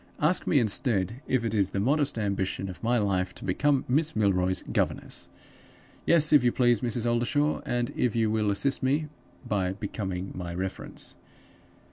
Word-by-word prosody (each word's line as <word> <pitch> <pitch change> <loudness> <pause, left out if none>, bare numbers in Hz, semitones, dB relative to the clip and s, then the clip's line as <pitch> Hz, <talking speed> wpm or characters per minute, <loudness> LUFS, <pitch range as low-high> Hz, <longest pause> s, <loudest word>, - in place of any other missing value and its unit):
Ask 160 +5 +1
me, 150 - +3
instead, 115 -1 +1
if 125 -3 +1
it 115 - -2
is 100 -3 +2
the 100 - -3
modest 140 +5 +1
ambition 95 -2 -2
of 90 - -9
my 120 +2 +1
life 95 -4 0
to - - -9
become 140 +8 +1
Miss 150 +5 +1
Milroy's 95 -3 +1
governess?' - - -1 0.8
Yes, 155 -2 +6
if 145 - +6
you 120 - +3
please, 120 -3 +2
Mrs. 120 -1 -2
Oldershaw, 120 +6 +1
and 120 0 -1
if 120 -3 0
you 110 -2 +2
will 110 -1 +1
assist 135 +7 0
me 145 +4 0 0.4
by 95 -4 0
becoming 95 -2 -5
my 85 -1 -6
reference. 95 +1 -4
115 Hz, 165 wpm, -27 LUFS, 95-130 Hz, 0.8 s, Yes